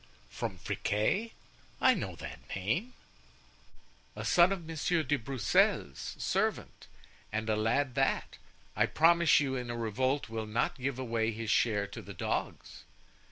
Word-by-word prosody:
"From - - -4
Friquet? 150 - -1 0.5
I - - +6
know - - -4
that - - -8 0.2
name——" 115 - -1 1.2
"A - - -5
son 175 +1 +5
of 185 -4 -3
Monsieur 165 +1 0
de 145 +1 +1
Broussel's 120 -6 0
servant, - - -2 0.4
and 110 +1 -2
a 110 - +2
lad 120 +5 +1
that, 135 0 0 0.4
I - - +3
promise 170 0 +5
you, 135 -2 -1
in 125 -2 -4
a 120 - -3
revolt 130 +5 0
will 110 -1 -4
not 110 +5 -1
give 135 0 -1
away 115 -3 -1
his 110 0 -3
share 105 -4 +2
to 100 +3 -8
the 100 -1 -10
dogs." - - -4
120 Hz, 145 wpm, -31 LUFS, 110-145 Hz, 1.2 s, I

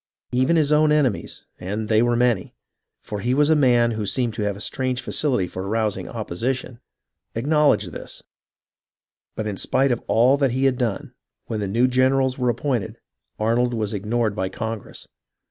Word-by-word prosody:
Even 130 +6 +2
his 155 -3 +2
own 150 0 +4
enemies, 140 -8 0
and 105 +4 -4
they 110 0 +3
were 120 0 +2
many, 120 -6 +1 0.5
for 105 - -5
he 120 +5 0
was 150 +2 +3
a - - +6
man 120 -5 +4
who 110 -2 -3
seemed 120 +1 -1
to 110 - -5
have 105 -1 -1
a - - -10
strange 130 +3 -2
facility 130 -9 0
in - - -10
arous 110 +1 0
ing 95 -2 -7
opposition, 120 +4 -4 0.6
acknowledged 150 +5 +2
this; - - -9 1.1
but 110 - -3
in 105 -2 -3
spite 135 +6 +1
of 120 - -1
all 125 +5 +4
that 135 -4 +1
he 130 +2 +1
had 130 -2 +2
done, 115 -5 -2 0.3
when 110 - -3
the 100 - -2
new 115 +6 +2
generals 130 +1 +2
were 125 -1 +1
appointed, 120 -2 -2 0.4
Arnold 120 +3 +1
was 110 -1 -2
ignored 105 +1 -1
by 95 -2 -2
Congress. 110 +2 -6
120 Hz, 180 wpm, -23 LUFS, 110-130 Hz, 1.1 s, a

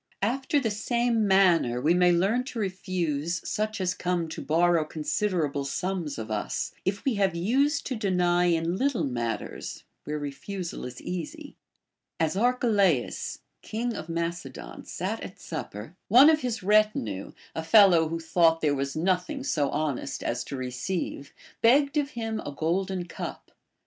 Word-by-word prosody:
After 265 +6 +1
the 230 -6 -1
same 230 +1 +1
manner 175 -11 +4
we 155 +7 +3
may 180 0 +5
learn 195 +8 +2
to 255 - -7
refuse 175 -5 -2
such 215 0 -2
as 180 -1 0
come 175 -2 -1
to - - -6
borrow 170 +1 +3
considerable 155 -2 -1
sums 175 +2 -3
of 110 -1 -6
us, 105 -1 -2
if 195 +1 -2
we 270 - +2
have 190 -3 +2
used 275 - +1
to 260 - -2
deny 180 -4 +2
in 170 +1 +1
little 270 +1 +1
matters 120 -3 -4 0.2
where 150 0 -2
refusal 165 +6 -5
is 125 0 -8
easy. 295 - -6 0.6
As 160 +1 +1
Arche 245 +5 +1
laus, 195 - +1 0.2
king 230 +2 -3
of 155 - -7
Macedon, 170 - -5
sat - - -3
at - - -8
supper, 105 - -7
one 260 +9 +8
of 310 -1 +1
his 230 -5 -3
retinue, 205 - +1 0.2
a 160 - -3
fellow 170 -3 +6
who 165 +1 -3
thought 165 0 +3
there 150 -2 +2
was 140 0 -2
nothing 185 - 0
so 150 - +1
honest 145 -3 -2
as 120 - -1
to 140 - -5
re 130 -1 -4
ceive, 140 +1 -4 0.3
begged 275 +5 +4
of 290 -2 +1
him 225 -1 -2
a - - -5
golden 180 +4 -1
cup. - - -7
180 Hz, 160 wpm, -27 LUFS, 155-215 Hz, 0.6 s, one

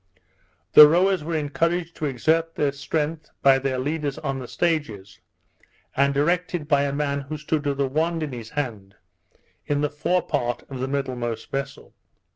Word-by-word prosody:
The 150 - +11
rowers 180 +2 +2
were 165 +1 -3
encouraged 165 +3 -1
to 155 - -1
exert 160 +5 0
their 145 -2 +1
strength 150 +2 -3
by 135 -1 +6
their 135 -1 -1
leaders 145 +1 -2
on 135 -3 -3
the 125 - -7
stages, 115 - -2 0.8
and 140 +1 +3
directed 165 +2 0
by 145 -1 +3
a 140 - -1
man 140 0 -1
who 145 +3 -6
stood 150 0 -2
with 140 -1 -1
a 140 - +3
wand 160 +4 0
in 150 - -4
his 115 -2 -7
hand 110 -9 -5 0.7
in 145 0 0
the 150 - 0
forepart 145 -6 -1
of 130 - -5
the 130 - -2
middlemost 125 -5 -3
vessel. 135 0 -5
145 Hz, 165 wpm, -24 LUFS, 135-160 Hz, 0.8 s, The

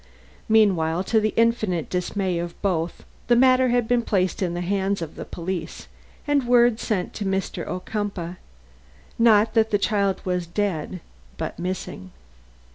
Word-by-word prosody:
Meanwhile, 185 -6 +3
to 220 - +6
the 215 0 0
infinite 220 -8 +1
dismay 180 0 -1
of 170 0 -6
both, 170 -4 -1 0.2
the 240 - +5
matter 255 +1 +5
had 240 -1 +1
been 245 0 +2
placed 190 -5 0
in 175 -2 -1
the 175 - -2
hands 195 +2 0
of 165 -3 -6
the - - -7
police 175 0 -5 0.4
and 285 -4 +1
word 240 -2 +4
sent 195 -6 -2
to 210 - -4
Mr. 190 -3 -2
Ocumpaugh, 185 -2 -4 0.8
not 220 -1 +5
that 220 -1 +3
the 205 - +2
child 200 -2 +1
was 180 -2 -1
dead, 180 -2 -2 0.4
but - - -5
missing. 180 - -5
195 Hz, 150 wpm, -24 LUFS, 180-220 Hz, 0.8 s, to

